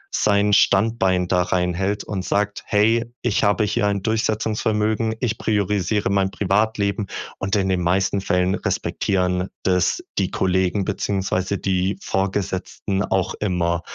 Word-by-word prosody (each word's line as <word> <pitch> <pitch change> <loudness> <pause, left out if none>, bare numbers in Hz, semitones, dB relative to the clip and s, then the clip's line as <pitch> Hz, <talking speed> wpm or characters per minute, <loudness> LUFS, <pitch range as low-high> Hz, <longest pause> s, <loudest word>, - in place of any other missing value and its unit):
sein 105 0 +2
Standbein 95 -3 +3
da 90 -1 +2
reinhält 90 +3 -1
und 95 -3 -4
sagt: 105 +1 -1
„Hey, 115 +3 +2
ich 120 -4 +1
habe 105 +1 +3
hier 105 0 0
ein 100 -1 0
Durchsetzungsvermögen, 110 0 0
ich 120 -4 -1
priorisiere 105 -1 0
mein 95 -1 +2
Privatleben." 100 +1 0 0.3
Und 95 +2 -1
in 95 -1 +1
den 90 -1 +1
meisten 95 +2 +1
Fällen 90 -1 +1
respektieren 90 -1 -1
das 90 -2 +1 0.2
die - - 0
Kollegen 95 +1 +1
beziehungsweise 95 -1 -1
die 95 0 0
Vorgesetzten 95 0 -2
auch 95 -1 0
immer. 85 -4 -1
100 Hz, 130 wpm, -22 LUFS, 95-105 Hz, 0.3 s, Standbein